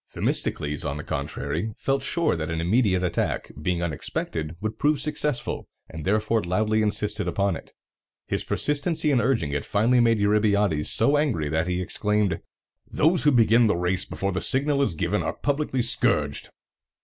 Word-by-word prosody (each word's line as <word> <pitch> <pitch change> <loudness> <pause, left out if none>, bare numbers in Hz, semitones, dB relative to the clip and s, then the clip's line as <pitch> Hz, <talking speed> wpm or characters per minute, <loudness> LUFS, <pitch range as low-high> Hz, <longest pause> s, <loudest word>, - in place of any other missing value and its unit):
Themistocles, 75 0 -1
on 70 0 -3
the 75 - -6
contrary, 85 +10 -3
felt 135 0 0
sure 160 - 0
that 80 -1 -4
an 80 0 -2
immediate 95 +1 +2
attack, 90 - -2
being 85 +1 -1
unexpected, 80 0 -3
would 110 +2 -4
prove 150 0 +2
successful, 150 -3 -2 0.2
and 80 -1 -8
therefore 110 +2 +1
loudly 110 +5 +1
insisted 105 0 -1
upon 100 -2 0
it. - - -10 0.6
His - - -2
persistency 150 +1 0
in 130 -4 +3
urging 115 - 0
it 75 0 -2
finally 115 +4 +2
made 115 -1 +4
Eurybiades 100 -6 +2
so 145 +1 +3
angry 120 - 0
that 80 +3 0
he 90 0 -1
exclaimed, 105 -2 0 0.5
"Those 165 +1 +2
who 150 - +6
begin 115 -1 +4
the 105 - +1
race 90 +1 +1
before 100 0 -3
the 95 - -2
signal 140 +1 +3
is 110 -12 0
given - - -1
are - - -2
publicly 140 -3 -1
scourged!" 120 - +1
105 Hz, 165 wpm, -25 LUFS, 85-130 Hz, 0.6 s, who